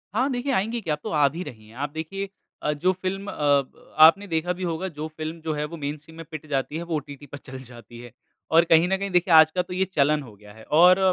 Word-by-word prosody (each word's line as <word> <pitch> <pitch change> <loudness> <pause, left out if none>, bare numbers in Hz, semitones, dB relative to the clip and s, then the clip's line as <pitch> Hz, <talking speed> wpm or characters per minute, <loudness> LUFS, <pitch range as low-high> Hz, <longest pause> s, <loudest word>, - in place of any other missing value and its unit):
हाँ 255 +5 +2
देखिए, 255 +2 -2
आएँगी 225 +3 0
क्या, 165 -7 -2
अब - - -21
तो - - -4
आ 150 -2 +3
भी 170 +5 -6
रही 110 -9 -11
हैं। 110 - -17
आप 145 +3 -3
देखिए 195 +5 -5 0.3
अ, 150 - 0
जो 175 +6 +1
फ़िल्म 190 +2 -4
अब 145 -2 -1
आपने 195 +6 +4
देखा 170 +1 -1
भी 180 +1 -7
होगा, 170 +1 -2
जो 155 -3 -6
फ़िल्म 155 +1 -7
जो 160 -1 -2
है, 150 0 -2
वो 165 +3 -8
मेनस्ट्रीम 150 +2 -6
में 165 - -8
पिट 155 -1 -7
जाती 140 +2 -2
है, 170 - -4
वो 170 -1 -3
ओटीटी 145 -1 -7
पर 145 0 -9
चल 130 -1 -10
जाती 120 -1 -13
है। 120 0 -11 0.4
और 165 +1 +6
कहीं 165 +2 +6
न 190 +1 +1
कहीं 200 +1 -4
देखिए, 180 -1 +2
आज 160 0 +8
का 180 - 0
तो 180 - -8
ये 190 +1 +1
चलन 150 -1 +2
हो 115 -5 -13
गया 105 0 -16
है 110 +1 -14
और 180 +7 +5
160 Hz, 270 wpm, -24 LUFS, 145-180 Hz, 0.4 s, आज